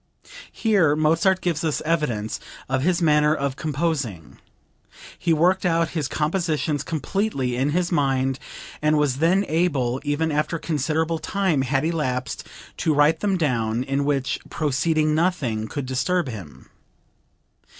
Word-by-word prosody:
Here 195 Hz, -10 st, +2 dB
Mozart 165 Hz, +5 st, +2 dB
gives 170 Hz, -3 st, -1 dB
us 155 Hz, -3 st, 0 dB
evidence 150 Hz, -10 st, -1 dB, 0.3 s
of 130 Hz, 0 st, 0 dB
his 175 Hz, +3 st, +1 dB
manner 150 Hz, -1 st, +4 dB
of 140 Hz, -3 st, -2 dB
composing; 140 Hz, -, -3 dB, 0.8 s
he 170 Hz, -, 0 dB
worked 180 Hz, +4 st, +3 dB
out 165 Hz, -2 st, +2 dB
his 155 Hz, -5 st, -2 dB
compositions 155 Hz, -2 st, -1 dB
completely 155 Hz, -, -2 dB
in 135 Hz, +3 st, +1 dB
his 175 Hz, +3 st, 0 dB
mind 135 Hz, -4 st, +1 dB, 0.4 s
and 155 Hz, 0 st, +3 dB
was 145 Hz, -3 st, +1 dB
then 180 Hz, +6 st, +3 dB
able, 140 Hz, -7 st, 0 dB
even 155 Hz, +2 st, 0 dB
after 150 Hz, +3 st, 0 dB
considerable 160 Hz, +1 st, -1 dB
time 190 Hz, -8 st, 0 dB
had 135 Hz, +2 st, 0 dB
elapsed, 130 Hz, -7 st, -2 dB, 0.3 s
to 155 Hz, -2 st, +1 dB
write 150 Hz, +2 st, +4 dB
them 200 Hz, -2 st, +1 dB
down, 120 Hz, -7 st, 0 dB
in 135 Hz, +1 st, -1 dB
which 140 Hz, -2 st, 0 dB
proceeding 155 Hz, +1 st, +1 dB
nothing 150 Hz, -10 st, 0 dB
could 140 Hz, +3 st, -4 dB
disturb 150 Hz, +6 st, 0 dB
him. 95 Hz, -11 st, -10 dB
150 Hz, 135 wpm, -23 LUFS, 135-165 Hz, 0.8 s, manner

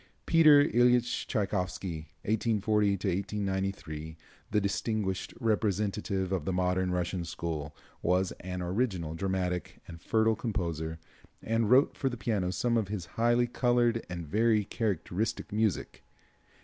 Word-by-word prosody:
Peter 155 Hz, -3 st, +7 dB
Iljitch 120 Hz, -1 st, +2 dB
Tschaikowsky 95 Hz, -, -2 dB, 0.2 s
(1840 105 Hz, -1 st, +2 dB, 0.5 s
1893), 95 Hz, -5 st, -3 dB, 0.3 s
the 105 Hz, -, +2 dB
distinguished 100 Hz, -1 st, -1 dB
representative 105 Hz, -3 st, 0 dB
of 95 Hz, -5 st, 0 dB
the 95 Hz, -, -2 dB
modern 90 Hz, 0 st, +1 dB
Russian 90 Hz, 0 st, -1 dB
school, 80 Hz, -3 st, -4 dB, 0.3 s
was 90 Hz, +1 st, +1 dB
an 90 Hz, 0 st, -5 dB
original, 90 Hz, -4 st, -1 dB
dramatic 90 Hz, 0 st, -2 dB
and 85 Hz, -1 st, -10 dB
fertile 110 Hz, +2 st, +2 dB
composer 85 Hz, -8 st, -3 dB, 0.5 s
and 115 Hz, -1 st, +1 dB
wrote 130 Hz, +4 st, +5 dB
for 135 Hz, -, 0 dB
the 125 Hz, -, -6 dB
piano 105 Hz, -5 st, -1 dB
some 115 Hz, +6 st, +1 dB
of 110 Hz, -3 st, 0 dB
his 100 Hz, -4 st, -4 dB
highly 120 Hz, +1 st, +3 dB
colored 120 Hz, -1 st, +1 dB
and 85 Hz, -2 st, -5 dB
very 105 Hz, +4 st, +2 dB
characteristic 105 Hz, -1 st, -2 dB
music. 105 Hz, -3 st, -1 dB
100 Hz, 125 wpm, -30 LUFS, 90-115 Hz, 0.5 s, Peter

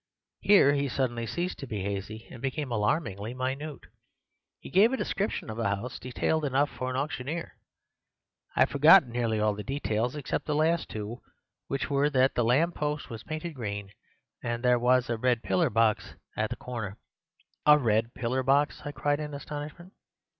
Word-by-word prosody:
Here 190 Hz, -9 st, +6 dB
he 140 Hz, -1 st, 0 dB
suddenly 120 Hz, -3 st, -1 dB
ceased 175 Hz, +7 st, -3 dB
to 135 Hz, -, -6 dB
be 105 Hz, -5 st, -3 dB
hazy, 100 Hz, +3 st, -4 dB
and 120 Hz, -, -10 dB
became 135 Hz, 0 st, -3 dB
alarmingly 110 Hz, -, -1 dB
minute. 135 Hz, +4 st, -4 dB, 0.8 s
He -, -, -11 dB
gave 205 Hz, +6 st, +5 dB
a 265 Hz, -, 0 dB
description 200 Hz, -3 st, -2 dB
of 110 Hz, 0 st, -6 dB
the 115 Hz, -, 0 dB
house 115 Hz, +5 st, -7 dB
detailed 130 Hz, +6 st, -1 dB
enough 140 Hz, +1 st, +1 dB
for 130 Hz, -, -4 dB
an 130 Hz, -, -3 dB
auctioneer. 145 Hz, +3 st, -3 dB, 1.0 s
I -, -, +2 dB
have -, -, +4 dB
forgotten 150 Hz, -1 st, +7 dB
nearly 115 Hz, -2 st, 0 dB
all 105 Hz, 0 st, +2 dB
the 105 Hz, -, -6 dB
details 120 Hz, -1 st, -1 dB
except 145 Hz, +1 st, -3 dB
the 150 Hz, -, 0 dB
last 160 Hz, +2 st, +1 dB
two, 110 Hz, +3 st, -6 dB, 0.5 s
which 140 Hz, -, -2 dB
were 140 Hz, +1 st, +3 dB
that 130 Hz, -2 st, +3 dB
the 120 Hz, -, +1 dB
lamp 145 Hz, +9 st, +3 dB
post 150 Hz, -2 st, -3 dB
was 115 Hz, -, -6 dB
painted 155 Hz, +2 st, -5 dB
green, 105 Hz, -6 st, -5 dB, 0.5 s
and 120 Hz, +1 st, -3 dB
that 125 Hz, -, +4 dB
there 125 Hz, -1 st, +4 dB
was 125 Hz, +1 st, +3 dB
a 115 Hz, -, -1 dB
red 120 Hz, 0 st, +1 dB
pillar 95 Hz, -1 st, +2 dB
box 110 Hz, -1 st, +1 dB, 0.2 s
at 110 Hz, 0 st, 0 dB
the 120 Hz, -, -3 dB
corner. 110 Hz, -7 st, -6 dB, 0.7 s
"'A 150 Hz, 0 st, +9 dB
red 115 Hz, -3 st, +1 dB
pillar 125 Hz, +2 st, -1 dB
box!' 140 Hz, +3 st, +2 dB
I 145 Hz, -, -4 dB
cried 145 Hz, 0 st, 0 dB
in 150 Hz, -1 st, -5 dB
astonishment. 150 Hz, +6 st, -7 dB
130 Hz, 180 wpm, -28 LUFS, 115-150 Hz, 1.0 s, A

